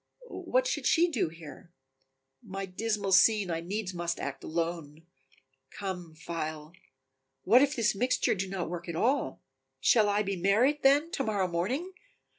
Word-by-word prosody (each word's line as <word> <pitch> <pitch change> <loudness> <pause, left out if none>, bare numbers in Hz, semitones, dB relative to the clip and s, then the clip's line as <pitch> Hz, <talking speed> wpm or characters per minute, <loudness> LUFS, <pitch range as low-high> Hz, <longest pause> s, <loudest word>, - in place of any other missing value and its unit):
What - - 0
should - - -1
she 345 +2 +4
do 230 - 0
here? 165 +1 -12 0.7
My 195 +1 -6
dismal 200 +1 -2
scene 200 -1 +5
I 165 - -1
needs 190 +3 -4
must 170 -1 -3
act 140 -1 -5
alone. 165 -2 -4 0.6
Come, 180 -5 -6
phial. 155 -1 -5 0.7
What 240 +6 +6
if 285 +1 +2
this 215 -5 +2
mixture 250 +5 +1
do 190 -1 -3
not 185 -3 -3
work 175 +1 -6
at 170 - -4
all, 240 - 0 0.4
Shall 210 - +4
I 205 +1 +1
be 195 -1 -2
married, 220 +11 +2
then, 290 +5 +4
to 270 - -2
morrow 205 -5 0
morning? 245 - -2
195 Hz, 155 wpm, -29 LUFS, 170-230 Hz, 0.7 s, What